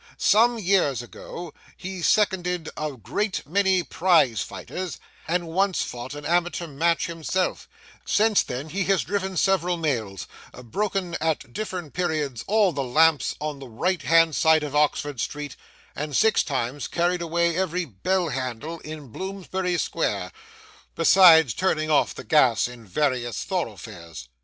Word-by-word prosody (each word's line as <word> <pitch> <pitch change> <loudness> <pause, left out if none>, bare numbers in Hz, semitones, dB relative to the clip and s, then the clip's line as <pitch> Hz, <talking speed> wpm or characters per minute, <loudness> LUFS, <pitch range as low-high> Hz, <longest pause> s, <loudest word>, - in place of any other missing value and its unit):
Some 235 +3 +4
years 180 - +1
ago 170 +6 -9 0.2
he 190 0 -6
seconded 180 -4 +1
a 150 -1 -3
great 195 - -3
many 190 +3 +2
prize 165 - +2
fighters, 185 -2 -6 0.3
and 170 +1 -1
once 190 +3 +1
fought 125 +3 -7
an 145 0 -8
amateur 175 +1 0
match 165 +2 0
himself; 170 +2 -2 0.3
since 215 -1 +3
then 130 +5 -5
he 190 +4 -2
has 195 -2 +2
driven 190 -1 -3
several 180 -2 +2
mails, 115 - -2 0.4
broken 190 - -2
at 155 -6 -2
different 185 -7 -5
periods 155 -9 -2
all 210 -2 +3
the 145 - -3
lamps 155 +4 +3
on 150 -2 -4
the 135 - -9
right 180 +11 -1
hand 165 -2 +4
side 160 -1 +4
of 150 -1 -5
Oxford 145 -2 +1
street, 145 -2 -5 0.4
and 150 -1 -4
six 220 +7 +4
times 135 0 -3
carried 175 +1 0
away 170 0 0
every 180 -1 -1
bell 175 - -1
handle 130 +5 -4
in 155 -3 -9
Bloomsbury 190 - -3
square, - - -2 0.6
besides 160 - +7
turning 155 -4 0
off 150 - +2
the - - -8
gas 130 -8 +3
in 120 -3 -12
various 125 0 -1
thoroughfares. 85 - -6
165 Hz, 140 wpm, -24 LUFS, 140-185 Hz, 0.6 s, besides